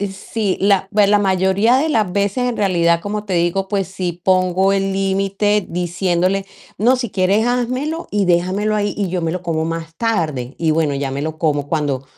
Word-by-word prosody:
Sí, 200 Hz, +1 st, -3 dB
la 195 Hz, -1 st, +2 dB
pues 205 Hz, -1 st, +4 dB
la 205 Hz, 0 st, +4 dB
mayoría 190 Hz, +4 st, +2 dB
de 295 Hz, +4 st, +1 dB
las 215 Hz, -, +1 dB
veces, 205 Hz, +6 st, 0 dB
en 240 Hz, -, -3 dB
realidad, 170 Hz, -4 st, +2 dB
como 205 Hz, +3 st, -4 dB
te 195 Hz, -3 st, -3 dB
digo, 175 Hz, +3 st, 0 dB
pues 195 Hz, -3 st, -1 dB
sí 180 Hz, -2 st, -5 dB
pongo 185 Hz, +1 st, +2 dB
el 195 Hz, 0 st, 0 dB
límite 195 Hz, +1 st, 0 dB
diciéndole: 180 Hz, +2 st, -1 dB, 0.3 s
"No, 245 Hz, +5 st, +4 dB
si 245 Hz, -4 st, -4 dB
quieres 195 Hz, +4 st, +2 dB
házmelo 255 Hz, +7 st, -2 dB
y 205 Hz, -1 st, +1 dB
déjamelo 185 Hz, +4 st, +1 dB
ahí 205 Hz, -1 st, 0 dB
y 200 Hz, -2 st, -1 dB
yo 180 Hz, 0 st, -2 dB
me 165 Hz, -, 0 dB
lo 180 Hz, +2 st, -3 dB
como 160 Hz, -2 st, -1 dB
más 165 Hz, 0 st, -5 dB
tarde". 155 Hz, -, -2 dB
Y 160 Hz, -2 st, +1 dB
bueno, 155 Hz, -2 st, +1 dB
ya 135 Hz, -1 st, -3 dB
me 140 Hz, +1 st, -3 dB
lo 155 Hz, 0 st, -4 dB
como 145 Hz, -3 st, 0 dB
cuando 145 Hz, -4 st, -1 dB
190 Hz, 195 wpm, -18 LUFS, 170-205 Hz, 0.3 s, pues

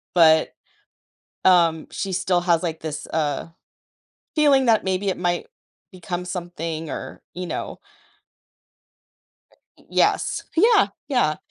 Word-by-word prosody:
but, 160 Hz, -2 st, +5 dB, 0.9 s
um, 170 Hz, -3 st, +4 dB
she 195 Hz, -, -4 dB
still 180 Hz, -1 st, +1 dB
has, 175 Hz, -1 st, +2 dB
like, 165 Hz, -2 st, -3 dB
this, 150 Hz, -1 st, -5 dB
uh, 150 Hz, -1 st, -1 dB, 0.9 s
feeling 280 Hz, -4 st, +4 dB
that 220 Hz, -3 st, +3 dB
maybe 190 Hz, +1 st, -1 dB
it 190 Hz, -, 0 dB
might 175 Hz, -1 st, -1 dB, 0.4 s
become 180 Hz, -1 st, -5 dB
something 170 Hz, -3 st, -5 dB
or, -, -, -7 dB
you 180 Hz, 0 st, -5 dB
know. -, -, -5 dB, 2.0 s
Y -, -, -22 dB
yes, -, -, +1 dB
yeah, 435 Hz, +4 st, +5 dB, 0.2 s
yeah. 245 Hz, -, +2 dB
175 Hz, 115 wpm, -23 LUFS, 160-190 Hz, 2.0 s, but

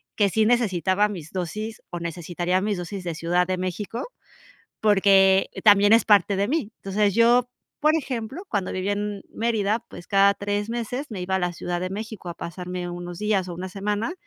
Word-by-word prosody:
que 205 Hz, -, +3 dB
sí 215 Hz, +3 st, +2 dB
necesitaba 205 Hz, -4 st, +2 dB
mis 165 Hz, -6 st, -7 dB
dosis, 215 Hz, +5 st, -4 dB
o 175 Hz, -, -4 dB
necesitaría 175 Hz, +2 st, -1 dB
mis 205 Hz, -1 st, -1 dB
dosis 180 Hz, +2 st, -6 dB
de 170 Hz, -, -3 dB
Ciudad 175 Hz, +2 st, +1 dB
de 185 Hz, 0 st, -1 dB
México, 195 Hz, +6 st, -4 dB, 0.8 s
porque, 195 Hz, -2 st, +5 dB, 0.2 s
también 205 Hz, 0 st, +6 dB
es 230 Hz, -, +4 dB
parte 205 Hz, -1 st, +5 dB
de 200 Hz, +2 st, 0 dB
mí. 270 Hz, -8 st, -1 dB
Entonces, 200 Hz, 0 st, 0 dB
yo, 240 Hz, +2 st, +4 dB, 0.3 s
por 305 Hz, +1 st, +4 dB
ejemplo, 265 Hz, -, -4 dB
cuando 200 Hz, -4 st, -2 dB
vivía 190 Hz, +2 st, -1 dB
en 205 Hz, -1 st, -4 dB
Mérida, 220 Hz, -2 st, 0 dB
pues 175 Hz, -, -11 dB
cada 200 Hz, 0 st, +5 dB
3 205 Hz, +1 st, -2 dB
meses 240 Hz, +4 st, -3 dB
me 195 Hz, -4 st, -5 dB
iba 190 Hz, +1 st, 0 dB
a -, -, -1 dB
la 180 Hz, 0 st, -1 dB
Ciudad 175 Hz, +1 st, -4 dB
de 185 Hz, -, -2 dB
México 215 Hz, -1 st, -6 dB
a -, -, -6 dB
pasarme 180 Hz, +1 st, -5 dB
unos 175 Hz, 0 st, -7 dB
días 205 Hz, -3 st, 0 dB
o 175 Hz, -, -5 dB
una 185 Hz, +2 st, -5 dB
semana, 205 Hz, -, -2 dB
200 Hz, 190 wpm, -24 LUFS, 180-215 Hz, 0.8 s, también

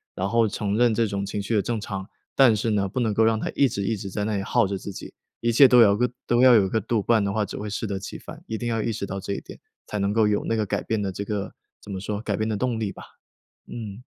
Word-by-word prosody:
然 95 Hz, +1 st, -1 dB
后 115 Hz, 0 st, +3 dB
承 105 Hz, +1 st, -2 dB
认 120 Hz, -2 st, +4 dB
这 115 Hz, +1 st, +2 dB
种 100 Hz, -1 st, -3 dB
情 100 Hz, +1 st, -3 dB
绪 105 Hz, +3 st, -2 dB
的 100 Hz, -, +3 dB
正 115 Hz, 0 st, -2 dB
常， 95 Hz, -1 st, -5 dB, 0.3 s
但 125 Hz, -5 st, +6 dB
是 115 Hz, +2 st, -1 dB
呢， 100 Hz, -2 st, +1 dB
不 130 Hz, -, -3 dB
能 110 Hz, -3 st, +1 dB
够 110 Hz, -, +1 dB
让 110 Hz, 0 st, +3 dB
它 -, -, -3 dB
一 140 Hz, -, +4 dB
直 100 Hz, -4 st, -3 dB
一 110 Hz, +2 st, -1 dB
直 100 Hz, 0 st, -6 dB
在 105 Hz, +2 st, -3 dB
那 105 Hz, -1 st, -1 dB
里 100 Hz, -, -2 dB
耗 100 Hz, -, +2 dB
着 100 Hz, 0 st, -2 dB
自 100 Hz, +1 st, -7 dB
己， -, -, -9 dB, 0.3 s
一 115 Hz, -, +1 dB
切 130 Hz, +4 st, +8 dB
都 125 Hz, -1 st, +6 dB
要 100 Hz, -3 st, +6 dB
个 125 Hz, +1 st, +1 dB, 0.2 s
都 120 Hz, +1 st, +2 dB
要 130 Hz, -2 st, +8 dB
有 95 Hz, -3 st, +4 dB
个 110 Hz, -, +1 dB
度， 110 Hz, +2 st, -1 dB
不 -, -, 0 dB
然 110 Hz, -2 st, +5 dB
的 100 Hz, 0 st, -1 dB
话 110 Hz, 0 st, +1 dB
只 100 Hz, -, -6 dB
会 105 Hz, +1 st, -5 dB
适 105 Hz, +2 st, -3 dB
得 100 Hz, -2 st, -3 dB
其 95 Hz, -, -7 dB
反。 -, -, -11 dB
一 110 Hz, -, -3 dB
定 120 Hz, +2 st, -3 dB
要 115 Hz, -1 st, 0 dB
意 115 Hz, -, -1 dB
识 100 Hz, -, -4 dB
到 95 Hz, 0 st, -5 dB
这 100 Hz, +1 st, -4 dB
一 -, -, -4 dB
点， -, -, -12 dB, 0.3 s
才 105 Hz, -, -3 dB
能 100 Hz, +1 st, 0 dB
够 110 Hz, 0 st, +3 dB
有 105 Hz, -1 st, 0 dB
那 115 Hz, -, 0 dB
个 110 Hz, -1 st, 0 dB
改 -, -, -2 dB
变 110 Hz, -2 st, -1 dB
的 95 Hz, -1 st, -2 dB
这 100 Hz, +2 st, -5 dB
个 100 Hz, -1 st, -4 dB, 0.3 s
怎 100 Hz, -, -10 dB
么 95 Hz, -, -4 dB
说， 105 Hz, +1 st, -4 dB
改 105 Hz, -3 st, -2 dB
变 110 Hz, 0 st, -1 dB
的 110 Hz, -, -1 dB
动 120 Hz, 0 st, -1 dB
力 100 Hz, -4 st, -2 dB
吧， -, -, -11 dB, 0.6 s
嗯。 110 Hz, 0 st, -7 dB
105 Hz, 340 characters per minute, -24 LUFS, 100-115 Hz, 0.6 s, 切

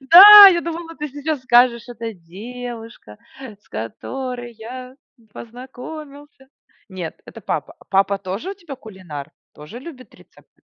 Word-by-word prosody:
Да, 400 Hz, +9 st, +11 dB
я 345 Hz, -3 st, +1 dB
думала, 335 Hz, 0 st, -7 dB
ты 300 Hz, 0 st, -6 dB
сейчас 290 Hz, +1 st, -4 dB
скажешь: 240 Hz, -1 st, +3 dB
"Это 230 Hz, -1 st, -7 dB
девушка, 225 Hz, -, -11 dB, 0.2 s
с 215 Hz, -6 st, -13 dB
которой 245 Hz, -, -7 dB
я 250 Hz, +3 st, -10 dB, 0.4 s
познакомился". 270 Hz, +4 st, -12 dB, 0.4 s
Нет, 180 Hz, -3 st, -7 dB
это -, -, -13 dB
папа. -, -, -5 dB
Папа 195 Hz, 0 st, +1 dB
тоже 195 Hz, -, -6 dB
у -, -, -7 dB
тебя 340 Hz, -8 st, -11 dB
кулинар? 175 Hz, -, -10 dB, 0.2 s
Тоже 150 Hz, +11 st, -11 dB
любит 260 Hz, -2 st, -13 dB
рецепты? -, -, -24 dB
245 Hz, 130 wpm, -19 LUFS, 210-290 Hz, 0.4 s, Да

